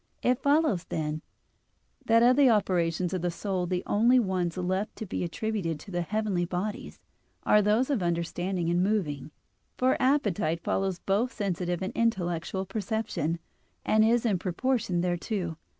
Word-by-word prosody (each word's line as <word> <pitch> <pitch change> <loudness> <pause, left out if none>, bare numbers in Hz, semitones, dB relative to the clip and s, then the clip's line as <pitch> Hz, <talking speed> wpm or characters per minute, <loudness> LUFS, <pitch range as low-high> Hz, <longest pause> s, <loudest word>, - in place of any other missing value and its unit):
It 250 +1 +2
follows, 285 - +2
then, 155 0 -3 0.9
that 230 +1 +5
of 250 +1 +6
the 280 -2 +6
operations 180 -5 +1
of 185 - -1
the 175 - 0
soul 180 +1 -2
the 180 0 -1
only 235 +5 +4
ones 185 -6 0
left 185 +3 -2
to 220 - -6
be 185 - -3
attributed 175 -3 -2
to 200 - -11
the 175 -1 -1
heavenly 205 0 -1
bodies 185 +4 -4 0.4
are 210 - +5
those 215 +7 +2
of 255 -8 +1
understanding 175 +1 -1
and 175 +1 +2
moving; 180 -9 -1 0.5
for 255 +1 +2
appetite 205 - +1
follows 190 -2 0
both 210 +8 0
sensitive 180 -4 -2
and 190 - -3
intellectual 190 -4 -1
perception, 200 -5 -2 0.5
and 215 0 +4
is 235 +2 +3
in 200 -6 +1
proportion 185 0 0
thereto. 175 -1 -2
190 Hz, 150 wpm, -28 LUFS, 175-220 Hz, 0.9 s, of